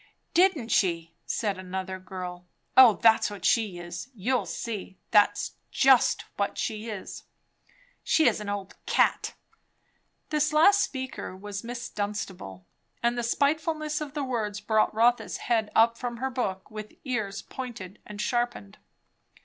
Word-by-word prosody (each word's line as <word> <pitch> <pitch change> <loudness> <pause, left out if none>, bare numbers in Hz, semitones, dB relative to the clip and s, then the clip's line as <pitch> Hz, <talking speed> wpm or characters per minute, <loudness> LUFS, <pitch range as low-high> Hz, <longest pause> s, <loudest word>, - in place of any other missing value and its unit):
"Didn't 340 -10 +3
she!" 170 -5 +1
said 205 -4 -1
another 185 0 -5
girl. 180 -1 -7 0.3
"O 255 -4 +9
that's 225 +1 +4
what 200 -3 -7
she 215 -6 +2
is! 175 +5 -7
You'll 230 0 0
see. 200 0 -5
That's 205 -1 +4 0.2
just 265 -2 +4
what 200 - -1
she 220 +1 -3
is." 210 -3 -7 0.8
"She 320 - +4
is - - +2
an 205 - -5
old 200 -1 -4
cat!" - - +2 1.0
This 300 0 +1
last 395 +7 +6
speaker 260 -8 -4
was 200 +1 -6
Miss 240 +1 -5
Dunstable, 195 - -5 0.4
and 235 0 +2
the 240 - -1
spitefulness 305 +4 0
of 295 -1 -6
the 295 - -1
words 220 -5 -2
brought 215 +1 +2
Rotha's 235 +3 +2
head 225 -3 0
up 230 +1 +4
from 240 -1 -4
her 265 +2 -2
book, 195 -7 -3
with 215 0 -8
ears 215 -7 -2
pointed 215 -7 -8
and 210 -1 -10
sharpened. 240 - -2
220 Hz, 140 wpm, -27 LUFS, 195-250 Hz, 1.0 s, O